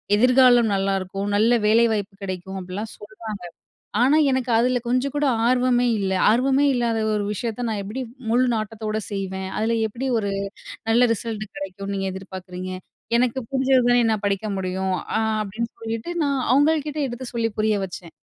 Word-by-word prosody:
எதிர்காலம் 250 Hz, 0 st, +5 dB
நல்லாருக்கும். 195 Hz, 0 st, -1 dB
நல்ல 220 Hz, +3 st, +4 dB, 0.2 s
வேலைவாய்ப்பு 215 Hz, -3 st, +2 dB
கிடைக்கும் 190 Hz, 0 st, -5 dB
அப்டிலாம் 190 Hz, +4 st, -6 dB
சொல்றாங்க. 215 Hz, -1 st, -8 dB, 0.6 s
ஆனா 270 Hz, +5 st, +5 dB
எனக்கு 260 Hz, -1 st, 0 dB
அதில 245 Hz, +1 st, +2 dB
கொஞ்சம் 255 Hz, +3 st, 0 dB
கூட 290 Hz, 0 st, +2 dB, 0.2 s
ஆர்வமே 250 Hz, 0 st, +3 dB
இல்லை. 190 Hz, -1 st, 0 dB
"ஆர்வமே 265 Hz, +5 st, +3 dB
இல்லாத 235 Hz, -2 st, 0 dB, 0.2 s
ஒரு 210 Hz, -1 st, 0 dB
விஷயத்த 230 Hz, +3 st, -3 dB
"நான் 215 Hz, -2 st, -2 dB
எப்படி, 220 Hz, +7 st, -4 dB, 0.3 s
முழு 245 Hz, +2 st, +4 dB
நாட்டத்தோடு 215 Hz, 0 st, -3 dB
செய்வேன்?" 190 Hz, -1 st, -3 dB
அதில 225 Hz, +2 st, +1 dB
"எப்டி 250 Hz, +5 st, -4 dB
ஒரு 205 Hz, -2 st, -1 dB, 0.6 s
நல்ல 230 Hz, +2 st, +4 dB
ரிசல்ட் 220 Hz, -1 st, -4 dB
கிடைக்கும்னு 195 Hz, +1 st, -5 dB
நீங்க 195 Hz, 0 st, -2 dB
எதிர்பார்க்குறீங்க?" 185 Hz, -1 st, -7 dB, 0.5 s
"எனக்கு 250 Hz, +1 st, +1 dB
புரிஞ்சதுதானே 260 Hz, -2 st, +3 dB
என்னால 220 Hz, -2 st, 0 dB
படிக்க 200 Hz, +2 st, -1 dB
முடியும்!" 190 Hz, 0 st, -1 dB, 0.2 s
அ -, -, +2 dB, 0.2 s
அப்படின்னு 220 Hz, +3 st, -4 dB
சொல்லிட்டு, 225 Hz, +7 st, -4 dB
நான் 280 Hz, -2 st, 0 dB
அவுங்கள்கிட்ட 300 Hz, +1 st, +2 dB
எடுத்து 240 Hz, +2 st, -6 dB
சொல்லி 230 Hz, -1 st, 0 dB
புரிய 215 Hz, -1 st, +2 dB
வச்சேன். 175 Hz, -2 st, -9 dB
220 Hz, 150 wpm, -23 LUFS, 195-245 Hz, 0.6 s, எதிர்காலம்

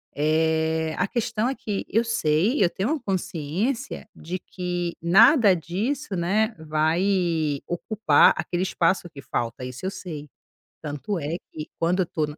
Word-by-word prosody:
Eh, 160 Hz, +1 st, +1 dB
a -, -, +2 dB
questão 225 Hz, -1 st, -1 dB
é 270 Hz, -, -2 dB
que 205 Hz, -3 st, -4 dB
eu 225 Hz, +3 st, +2 dB
sei, 220 Hz, -, +2 dB
eu 175 Hz, -, +4 dB
tenho 195 Hz, +8 st, -2 dB
a -, -, -5 dB
consciência 195 Hz, -, -3 dB
de 180 Hz, +3 st, -5 dB
que 175 Hz, -2 st, -4 dB
nada 205 Hz, -, +6 dB
disso, 205 Hz, -, -3 dB
né, 210 Hz, +6 st, +1 dB
vai 160 Hz, -1 st, +1 dB
ocupar 175 Hz, -2 st, +4 dB
aquele 175 Hz, +1 st, -2 dB
espaço 180 Hz, -1 st, +1 dB
que 140 Hz, -3 st, -11 dB
falta, 120 Hz, +1 st, -3 dB
isso 125 Hz, +7 st, -7 dB
eu 190 Hz, -, -1 dB
sei. 150 Hz, -7 st, -7 dB, 0.5 s
Tanto 150 Hz, +6 st, -4 dB
é 160 Hz, +2 st, -3 dB
que 155 Hz, -1 st, -7 dB
quando 175 Hz, +3 st, +2 dB
eu 180 Hz, -, +1 dB
tô 155 Hz, -1 st, -1 dB
na 150 Hz, +1 st, -9 dB
175 Hz, 155 wpm, -24 LUFS, 155-205 Hz, 0.5 s, nada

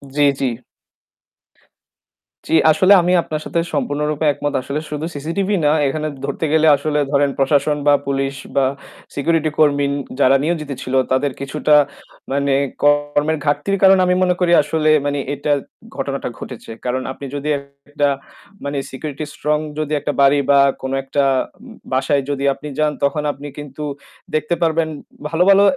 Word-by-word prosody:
জি, 145 Hz, -, +3 dB, 0.2 s
জি। -, -, 0 dB, 2.0 s
জি, -, -, -3 dB, 0.2 s
আসলে 185 Hz, +6 st, +5 dB
আমি 180 Hz, +1 st, +1 dB
আপনার 155 Hz, -2 st, -4 dB
সাথে 170 Hz, -, -1 dB
সম্পূর্ণরূপে 150 Hz, +1 st, -1 dB
একমত। 145 Hz, +1 st, -3 dB
আসলে 140 Hz, +3 st, -3 dB
শুধু 150 Hz, +1 st, -3 dB
CCTV 165 Hz, +7 st, -3 dB, 0.2 s
না, 145 Hz, -, +5 dB, 0.2 s
এখানে 155 Hz, +3 st, -2 dB, 0.2 s
ধরতে 140 Hz, +3 st, -2 dB
গেলে 160 Hz, 0 st, +4 dB
আসলে 150 Hz, +1 st, -1 dB
ধরেন 140 Hz, 0 st, +3 dB
প্রশাসন 145 Hz, +2 st, +2 dB
বা 145 Hz, -, +7 dB
পুলিশ 135 Hz, 0 st, -1 dB, 0.2 s
বা 135 Hz, -1 st, +3 dB, 0.5 s
security 160 Hz, +2 st, +1 dB
কর্মী 145 Hz, -2 st, +3 dB, 0.3 s
যারা 135 Hz, 0 st, +5 dB
নিয়োজিত 155 Hz, -3 st, -2 dB
ছিল 130 Hz, -, -5 dB, 0.2 s
তাদের 135 Hz, +2 st, +1 dB
কিছুটা 150 Hz, +2 st, +1 dB, 0.6 s
মানে 140 Hz, 0 st, +1 dB, 0.3 s
কর্মের 145 Hz, +1 st, +2 dB
ঘাটতির 195 Hz, +7 st, 0 dB
কারণ 190 Hz, 0 st, +7 dB
আমি 180 Hz, 0 st, +2 dB
মনে 180 Hz, -1 st, +2 dB
করি 175 Hz, -1 st, +2 dB
আসলে 155 Hz, +1 st, 0 dB, 0.2 s
মানে 145 Hz, 0 st, -1 dB
এটা 145 Hz, +1 st, -2 dB, 0.4 s
ঘটনাটা -, -, -3 dB
ঘটেছে। -, -, -9 dB
কারণ 125 Hz, +1 st, -1 dB
আপনি 140 Hz, -, -8 dB
যদি 145 Hz, +1 st, -3 dB
একটা 140 Hz, +1 st, -3 dB, 0.6 s
মানে 140 Hz, 0 st, -2 dB
security 145 Hz, +2 st, -5 dB
strong 150 Hz, 0 st, 0 dB, 0.2 s
যদি 155 Hz, -1 st, -3 dB
একটা 145 Hz, +1 st, -2 dB
বাড়ি 140 Hz, +1 st, +5 dB
বা 140 Hz, 0 st, +6 dB, 0.2 s
কোন 130 Hz, -, -4 dB
একটা 140 Hz, +1 st, 0 dB, 0.4 s
উম 240 Hz, 0 st, -13 dB, 0.2 s
বাসায় 135 Hz, +2 st, +2 dB
যদি 140 Hz, -1 st, -2 dB
আপনি 150 Hz, -, -10 dB
যান 150 Hz, 0 st, +2 dB
তখন 150 Hz, +2 st, +1 dB
আপনি 145 Hz, +1 st, -9 dB
কিন্তু 145 Hz, 0 st, -7 dB, 0.5 s
দেখতে 155 Hz, +2 st, 0 dB
পারবেন 165 Hz, 0 st, +2 dB, 0.4 s
ভালো, 165 Hz, +2 st, +2 dB
ভালো 200 Hz, 0 st, +7 dB
145 Hz, 155 wpm, -19 LUFS, 140-155 Hz, 2.0 s, বা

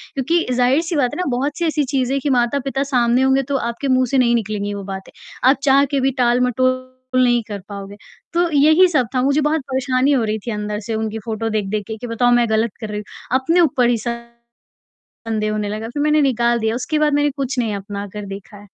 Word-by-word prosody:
क्योंकि 330 Hz, +6 st, +1 dB
ज़ाहिर-सी 285 Hz, +8 st, +2 dB
बात 250 Hz, -4 st, +1 dB
है -, -, -5 dB
ना 365 Hz, -, -1 dB
बहुत-सी 285 Hz, +7 st, -1 dB
ऐसी 305 Hz, -2 st, +1 dB
चीजें 270 Hz, 0 st, 0 dB
कि 290 Hz, -, -1 dB
माता-पिता 270 Hz, +2 st, 0 dB
सामने 250 Hz, -2 st, +2 dB
होंगे 265 Hz, +1 st, +3 dB
तो -, -, +1 dB
आपके 235 Hz, +4 st, -3 dB
मुँह 255 Hz, 0 st, +3 dB
से 270 Hz, -, +2 dB
नहीं 240 Hz, -2 st, +3 dB
निकलेंगी 205 Hz, -2 st, -2 dB
वो 200 Hz, -, -6 dB
बातें, 190 Hz, 0 st, -7 dB, 0.4 s
आप 275 Hz, -, +4 dB
चाह 275 Hz, 0 st, +5 dB
के 280 Hz, -, +1 dB
भी 270 Hz, +1 st, +2 dB
टाल 245 Hz, 0 st, +3 dB
मटोल 255 Hz, +1 st, 0 dB, 0.3 s
नहीं 240 Hz, -1 st, +3 dB
कर 205 Hz, -2 st, -5 dB
पाओगे। 200 Hz, 0 st, -8 dB, 0.4 s
तो 345 Hz, 0 st, +2 dB
यही 310 Hz, +6 st, +6 dB
सब 255 Hz, -8 st, +1 dB
था, 250 Hz, -, +2 dB
मुझे 280 Hz, +3 st, +2 dB
बहुत 300 Hz, +1 st, +1 dB
परेशानी 260 Hz, +1 st, +1 dB
हो 255 Hz, -5 st, +2 dB
रही 215 Hz, 0 st, -1 dB
थी -, -, -1 dB
अंदर 210 Hz, 0 st, -3 dB
से 225 Hz, -, -2 dB
उनकी 220 Hz, 0 st, -3 dB
फ़ोटो 225 Hz, 0 st, -2 dB
देख-देख 210 Hz, -1 st, -2 dB
के 220 Hz, 0 st, -5 dB
कि 245 Hz, -, -7 dB
बताओ 245 Hz, +1 st, +1 dB
मैं 240 Hz, -2 st, +3 dB
ग़लत 220 Hz, 0 st, +1 dB
कर 215 Hz, -, -5 dB
रही 210 Hz, -, -4 dB
हूँ, 210 Hz, -, -9 dB, 0.3 s
अपने 330 Hz, +7 st, +1 dB
ऊपर 255 Hz, -6 st, +3 dB
ही 240 Hz, -, +2 dB
शंदेह 235 Hz, +1 st, -9 dB, 0.8 s
होने 210 Hz, -1 st, -2 dB
लगा, 215 Hz, +2 st, -4 dB
फ़िर 290 Hz, +4 st, -3 dB
मैंने 300 Hz, 0 st, +3 dB
निकाल 240 Hz, -3 st, +2 dB
दिया, 220 Hz, +1 st, 0 dB
उसके 280 Hz, +5 st, -1 dB
बाद 300 Hz, -1 st, +2 dB
मैंने 290 Hz, 0 st, +2 dB
कुछ 270 Hz, -1 st, -3 dB
नहीं 220 Hz, -4 st, 0 dB
अपना 200 Hz, +1 st, -6 dB
कर 210 Hz, -1 st, -6 dB
देखा 205 Hz, +1 st, -14 dB
है। 205 Hz, -, -13 dB
245 Hz, 225 wpm, -19 LUFS, 220-275 Hz, 0.8 s, यही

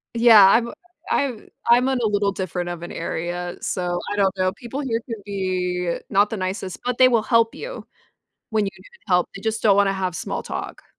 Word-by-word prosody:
Yeah, 230 Hz, -3 st, +8 dB
I'm 235 Hz, +3 st, +2 dB, 0.4 s
I'm 260 Hz, -6 st, -1 dB, 0.2 s
I'm 245 Hz, +2 st, +5 dB
in 265 Hz, -1 st, +1 dB
a -, -, +3 dB
little 205 Hz, -1 st, +1 dB
different 180 Hz, -2 st, -4 dB
of 175 Hz, -1 st, -6 dB
an 175 Hz, -, -7 dB
area, 175 Hz, +1 st, -4 dB
so 175 Hz, -1 st, -2 dB
I 205 Hz, -, -1 dB
don't 195 Hz, -1 st, +2 dB
know, 185 Hz, 0 st, +1 dB
people 260 Hz, +6 st, -6 dB
here 230 Hz, -4 st, -1 dB
could 225 Hz, -4 st, -7 dB
be 180 Hz, -3 st, -2 dB
not 200 Hz, +2 st, +3 dB
the 220 Hz, -, -4 dB
nicest, 185 Hz, 0 st, -4 dB
but 250 Hz, -1 st, -2 dB
they 255 Hz, -, +7 dB
will 235 Hz, -3 st, +3 dB
help 230 Hz, -1 st, +3 dB
you, -, -, -8 dB, 0.6 s
when 215 Hz, -2 st, +1 dB
you 195 Hz, -, -3 dB
need 475 Hz, -1 st, -19 dB
help, 180 Hz, -2 st, +2 dB
they 195 Hz, -, -8 dB
just 220 Hz, 0 st, -2 dB
don't 205 Hz, -3 st, +5 dB
wanna 200 Hz, -1 st, +3 dB
have 185 Hz, -2 st, -2 dB
small -, -, -3 dB
talk. -, -, -6 dB
200 Hz, 210 wpm, -22 LUFS, 185-230 Hz, 0.6 s, Yeah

